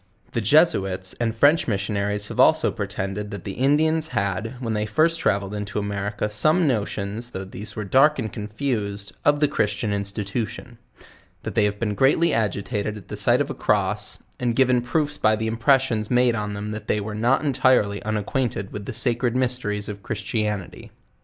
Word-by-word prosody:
The 115 Hz, -, -1 dB
Jesuits 95 Hz, -, +3 dB
and 115 Hz, -1 st, -1 dB
French 145 Hz, +7 st, +4 dB
Missionaries 105 Hz, 0 st, -1 dB
have -, -, -7 dB
also -, -, +5 dB
pretended, 100 Hz, +2 st, -4 dB
that 100 Hz, -4 st, -7 dB
the 100 Hz, -, -5 dB
Indians 155 Hz, +7 st, +2 dB
had, 105 Hz, +5 st, -2 dB
when 115 Hz, -3 st, -2 dB
they 105 Hz, 0 st, -1 dB
first 165 Hz, +9 st, +2 dB
travelled 100 Hz, 0 st, 0 dB
into 105 Hz, -1 st, -4 dB
America, 100 Hz, +1 st, -2 dB
some 155 Hz, -, +2 dB
notions, 110 Hz, -1 st, -2 dB
though 95 Hz, -5 st, -6 dB
these 100 Hz, +3 st, -6 dB
were 110 Hz, -, -3 dB
dark 135 Hz, +9 st, +4 dB
and 110 Hz, -5 st, -4 dB
confused, 105 Hz, -2 st, -3 dB
of 145 Hz, 0 st, +3 dB
the 150 Hz, -, +5 dB
Christian 105 Hz, -4 st, -1 dB
institution; 105 Hz, +4 st, -4 dB, 0.6 s
that -, -, -4 dB
they 105 Hz, -, +3 dB
have 105 Hz, 0 st, -2 dB
been 105 Hz, -3 st, -1 dB
greatly 145 Hz, +9 st, +3 dB
agitated 105 Hz, 0 st, -1 dB
at 105 Hz, -, -13 dB
the -, -, -4 dB
sight 120 Hz, +6 st, +3 dB
of 145 Hz, 0 st, -2 dB
a -, -, -3 dB
crosp, 105 Hz, -2 st, -1 dB, 0.2 s
and 120 Hz, -2 st, 0 dB
given 125 Hz, -1 st, +3 dB
proofs 145 Hz, +3 st, -1 dB
by 110 Hz, 0 st, +3 dB
the 110 Hz, +1 st, -3 dB
impressions 115 Hz, -1 st, +1 dB
made 125 Hz, -1 st, +3 dB
on 105 Hz, -2 st, -3 dB
them 105 Hz, +1 st, -5 dB
that 105 Hz, 0 st, -7 dB
they 105 Hz, -, +1 dB
were 105 Hz, +1 st, -5 dB
not 120 Hz, +7 st, +1 dB
entirely 130 Hz, -7 st, +2 dB
unacquainted 110 Hz, 0 st, -2 dB
with 100 Hz, -1 st, -6 dB
tlie 130 Hz, -, -4 dB
sacred 120 Hz, 0 st, 0 dB
mysteries 125 Hz, -5 st, 0 dB
of 100 Hz, -1 st, -7 dB
Christianity. 105 Hz, -2 st, -3 dB
110 Hz, 180 wpm, -23 LUFS, 100-125 Hz, 0.6 s, also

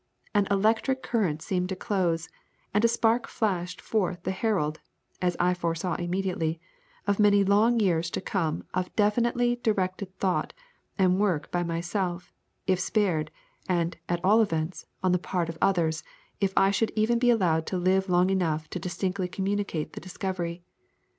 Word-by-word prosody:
An 205 Hz, -2 st, +3 dB
ELECTRIC 220 Hz, +6 st, +1 dB
circuit 180 Hz, -10 st, +1 dB
seemed 180 Hz, -1 st, -1 dB
to 190 Hz, -, -2 dB
CLOSE; 180 Hz, -6 st, 0 dB, 0.5 s
and 210 Hz, +2 st, +2 dB
a -, -, +7 dB
spark 230 Hz, 0 st, +2 dB
flashed 180 Hz, -5 st, -2 dB
forth 185 Hz, -5 st, -1 dB
the -, -, -1 dB
herald 185 Hz, -6 st, 0 dB, 0.4 s
(as 180 Hz, -1 st, +1 dB
I 180 Hz, +1 st, +3 dB
FORESAW 170 Hz, 0 st, -2 dB
IMMEDIATELY) 175 Hz, -2 st, -1 dB, 0.5 s
of 200 Hz, 0 st, +1 dB
many 205 Hz, -1 st, +5 dB
long 215 Hz, +4 st, +4 dB
years 170 Hz, -5 st, +2 dB
to -, -, -3 dB
come 165 Hz, -5 st, -1 dB
of 185 Hz, 0 st, -1 dB
definitely 240 Hz, +3 st, +2 dB
directed 190 Hz, -4 st, -1 dB
thought 185 Hz, -2 st, 0 dB, 0.4 s
and 185 Hz, -1 st, +3 dB
work 190 Hz, -8 st, 0 dB
by 175 Hz, -, 0 dB
MYSELF, 175 Hz, +1 st, -2 dB, 0.3 s
if 185 Hz, -1 st, +2 dB
spared, 180 Hz, -6 st, +1 dB, 0.4 s
and, 170 Hz, -1 st, +1 dB
at 175 Hz, +1 st, -1 dB
all 215 Hz, +4 st, +6 dB
events, 165 Hz, -4 st, -2 dB, 0.2 s
on 185 Hz, -, +3 dB
the 180 Hz, -, +3 dB
part 175 Hz, -2 st, -2 dB
of 165 Hz, -, -6 dB
OTHERS 165 Hz, -4 st, +2 dB, 0.4 s
if 195 Hz, -2 st, +1 dB
I 195 Hz, 0 st, +5 dB
should 220 Hz, +2 st, +1 dB
even 225 Hz, +2 st, +2 dB
be 245 Hz, 0 st, +3 dB
allowed 170 Hz, -9 st, +2 dB
to 185 Hz, -, -1 dB
live 190 Hz, +2 st, +2 dB
long 180 Hz, +1 st, +3 dB
enough 160 Hz, -5 st, 0 dB
distinctly 185 Hz, +1 st, -2 dB
to 180 Hz, -, -13 dB
communicate 195 Hz, -5 st, -2 dB
the -, -, -7 dB
discovery. 180 Hz, -2 st, -4 dB
185 Hz, 160 wpm, -27 LUFS, 175-205 Hz, 0.5 s, a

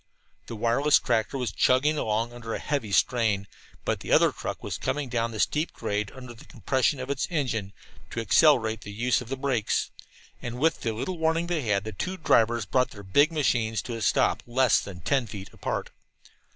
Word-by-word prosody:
The 115 Hz, -, -6 dB
wireless 120 Hz, +7 st, +3 dB
tractor 120 Hz, +2 st, 0 dB
was 125 Hz, -6 st, -2 dB
chugging 130 Hz, +9 st, +3 dB
along 115 Hz, -2 st, -1 dB
under 115 Hz, -2 st, -5 dB
a -, -, -2 dB
heavy 140 Hz, -8 st, -2 dB
strain, 110 Hz, -3 st, +2 dB, 0.4 s
but -, -, 0 dB
the -, -, -7 dB
other -, -, +5 dB
truck -, -, -6 dB
was -, -, -4 dB
coming 145 Hz, -2 st, -2 dB
down 115 Hz, -1 st, 0 dB
the 110 Hz, -2 st, -7 dB
steep 150 Hz, +9 st, 0 dB
grade 105 Hz, -3 st, -3 dB
under 125 Hz, -2 st, -9 dB
the 115 Hz, -, -15 dB
compression 130 Hz, +4 st, 0 dB
of 130 Hz, +2 st, -4 dB
its 140 Hz, -, -1 dB
engine, 120 Hz, -, -2 dB, 0.4 s
to -, -, -4 dB
accelerate 115 Hz, 0 st, +4 dB
the 100 Hz, -, -8 dB
use 120 Hz, +5 st, +1 dB
of 120 Hz, -, -10 dB
the 135 Hz, -, -3 dB
brakes. 130 Hz, -5 st, 0 dB, 0.5 s
And 120 Hz, 0 st, -5 dB
with 160 Hz, +5 st, +1 dB
the 115 Hz, -, -1 dB
little 170 Hz, +11 st, -4 dB
warning 160 Hz, +1 st, +1 dB
they 170 Hz, -3 st, -1 dB
had, 105 Hz, -5 st, 0 dB
the 110 Hz, -, -5 dB
two 185 Hz, -, -4 dB
drivers 120 Hz, -, +2 dB
brought 125 Hz, +7 st, +1 dB
their 100 Hz, -2 st, -11 dB
big 145 Hz, -, +3 dB
machines 120 Hz, -8 st, +1 dB
to 120 Hz, -, -5 dB
a 115 Hz, -, -6 dB
stop 105 Hz, -, +2 dB
less 125 Hz, 0 st, +3 dB
than 90 Hz, -3 st, -8 dB
ten 135 Hz, -, +1 dB
feet 100 Hz, -2 st, -8 dB
apart. -, -, -4 dB
120 Hz, 200 wpm, -26 LUFS, 110-140 Hz, 0.5 s, other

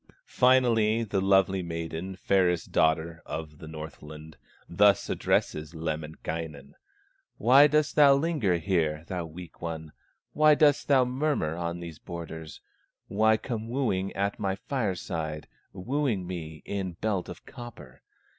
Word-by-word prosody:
Finally 115 Hz, -3 st, +3 dB
the 100 Hz, -3 st, -1 dB
lovely 95 Hz, -1 st, +3 dB
maiden, 85 Hz, +2 st, -5 dB
Fairest 90 Hz, -3 st, +1 dB
daughter 80 Hz, +1 st, +1 dB
of 75 Hz, -2 st, -7 dB
the 80 Hz, -, -10 dB
Northland, 80 Hz, 0 st, -9 dB, 0.3 s
Thus 100 Hz, +3 st, +3 dB
addresses 75 Hz, +2 st, -1 dB
Lemminkainen: 80 Hz, -2 st, -5 dB, 0.6 s
"Why 135 Hz, +6 st, +7 dB
dost 150 Hz, 0 st, +1 dB
linger 140 Hz, -, +4 dB
here, 80 Hz, -4 st, 0 dB
thou 90 Hz, -1 st, -4 dB
weak 85 Hz, +2 st, -11 dB
one, 80 Hz, -2 st, -5 dB, 0.4 s
Why 155 Hz, 0 st, +5 dB
dost 145 Hz, -1 st, +3 dB
murmur 130 Hz, -, +2 dB
on 85 Hz, 0 st, -4 dB
these 85 Hz, -3 st, -8 dB
borders, 80 Hz, -2 st, -8 dB, 0.5 s
Why 110 Hz, +2 st, +3 dB
come 115 Hz, -1 st, -5 dB
wooing 105 Hz, -7 st, -1 dB
at 100 Hz, +1 st, -2 dB
my 95 Hz, -2 st, -1 dB
fireside, 90 Hz, -, -3 dB, 0.2 s
Wooing 120 Hz, -1 st, -1 dB
me 80 Hz, -4 st, -7 dB
in 95 Hz, -3 st, -3 dB
belt 100 Hz, +1 st, -2 dB
of -, -, -10 dB
copper? 120 Hz, -, -11 dB
90 Hz, 120 wpm, -28 LUFS, 80-115 Hz, 0.6 s, Why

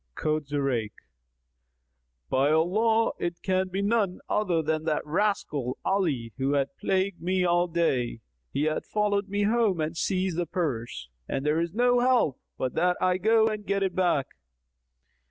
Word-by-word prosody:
Quoth 155 Hz, -1 st, -1 dB
Zurayk, 135 Hz, -7 st, -1 dB, 1.3 s
"By 135 Hz, +2 st, +2 dB
Allah 215 Hz, +9 st, +2 dB
it 175 Hz, 0 st, -4 dB
can 185 Hz, 0 st, +1 dB
be 190 Hz, +2 st, -2 dB
none 205 Hz, -3 st, +1 dB
other 175 Hz, -6 st, +1 dB
than 155 Hz, +1 st, -1 dB, 0.2 s
rascal 150 Hz, -, -1 dB
Ali 145 Hz, -, 0 dB
who 135 Hz, +1 st, 0 dB
hath 140 Hz, +5 st, 0 dB
plagued 190 Hz, 0 st, 0 dB
me 185 Hz, +1 st, +1 dB
all 175 Hz, 0 st, +2 dB
day! 135 Hz, -9 st, 0 dB, 0.3 s
He 140 Hz, -, -1 dB
hath 155 Hz, 0 st, -1 dB
followed 205 Hz, -1 st, 0 dB
me 205 Hz, +1 st, 0 dB
home 215 Hz, -4 st, +2 dB
and 155 Hz, +2 st, -2 dB
seized 185 Hz, 0 st, -1 dB
the 175 Hz, -, -1 dB
purse; 120 Hz, -, -3 dB, 0.2 s
and 135 Hz, -, -2 dB
there 150 Hz, +2 st, +2 dB
is 170 Hz, +2 st, -2 dB
no 245 Hz, +1 st, +3 dB
help 245 Hz, -, +2 dB, 0.2 s
but 130 Hz, -, -2 dB
that 180 Hz, +2 st, +1 dB
I 185 Hz, 0 st, +1 dB
go 220 Hz, +2 st, +4 dB
and 215 Hz, -1 st, -3 dB
get 200 Hz, 0 st, 0 dB
it 190 Hz, -2 st, -1 dB
back." 175 Hz, -7 st, +1 dB
175 Hz, 155 wpm, -27 LUFS, 150-200 Hz, 1.3 s, go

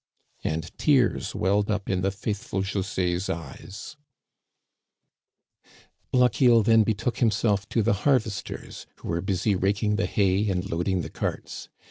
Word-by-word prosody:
And 80 Hz, +1 st, -3 dB
tears -, -, +2 dB
welled 100 Hz, +3 st, +1 dB
up 105 Hz, -2 st, -1 dB
in 95 Hz, -1 st, 0 dB
the 95 Hz, -, +1 dB
faithful 100 Hz, -1 st, -3 dB
Jose's 95 Hz, -2 st, -1 dB
eyes, 85 Hz, -, -7 dB, 2.1 s
Lochiel 125 Hz, -2 st, +4 dB
then 115 Hz, +1 st, +5 dB
betook 110 Hz, +2 st, -1 dB
himself 105 Hz, -3 st, +1 dB
to 115 Hz, -, +1 dB
the 115 Hz, -, +3 dB
harvesters, 125 Hz, -8 st, -1 dB
who -, -, -9 dB
were 85 Hz, +1 st, 0 dB
busy 95 Hz, +2 st, 0 dB
raking 100 Hz, +2 st, +1 dB
the -, -, 0 dB
hay 100 Hz, +1 st, +1 dB
and 90 Hz, 0 st, -1 dB
loading 90 Hz, +1 st, -1 dB
the 75 Hz, -, -7 dB
carts. -, -, -5 dB
100 Hz, 130 wpm, -26 LUFS, 95-110 Hz, 2.1 s, then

